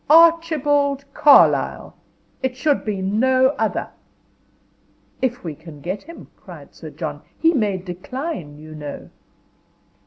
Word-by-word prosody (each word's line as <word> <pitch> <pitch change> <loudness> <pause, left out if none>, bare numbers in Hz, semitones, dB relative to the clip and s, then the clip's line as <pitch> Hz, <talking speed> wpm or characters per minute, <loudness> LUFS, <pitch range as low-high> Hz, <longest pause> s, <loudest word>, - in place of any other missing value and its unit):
Archibald 295 -4 +4
Carlyle. 290 -2 +4 0.5
It 260 -1 -2
should 285 +2 +1
be 200 -3 -3
no 255 +6 +3
other. - - -1 1.3
"If 245 -2 -1
we 165 -3 -4
can 155 0 -13
get 185 +7 -4
him," 335 +2 -13
cried - - -13
Sir - - -10
John. - - -6 0.2
"He 330 +1 +3
may 210 - 0
decline, 180 - -6
you 155 +1 -11
know." 150 -2 -8
255 Hz, 120 wpm, -21 LUFS, 180-290 Hz, 1.3 s, Archibald